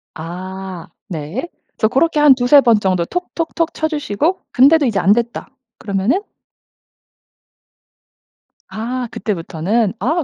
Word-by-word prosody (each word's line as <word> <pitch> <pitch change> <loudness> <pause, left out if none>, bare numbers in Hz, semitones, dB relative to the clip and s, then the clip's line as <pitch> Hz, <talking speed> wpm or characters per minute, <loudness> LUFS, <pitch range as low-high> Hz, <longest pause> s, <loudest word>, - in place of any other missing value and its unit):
아. 185 +1 -7 0.2
네. 175 - -5 0.3
그래서 220 - +2
고렇게 300 +7 +1
한 295 -2 +7
2-3 255 +3 +5
번 235 -5 +4
정도 185 -4 0
톡톡톡 335 - -3
쳐 315 - -1
주시고 305 - -1
근데도 285 +4 +5
이제 215 -6 +1
안됐다. 235 +4 +1 0.3
그러면은? 200 - 0 2.5
아 245 +3 -3
그때부터는? 195 +3 -1
아 315 +6 0
235 Hz, 225 characters per minute, -18 LUFS, 190-295 Hz, 2.5 s, 한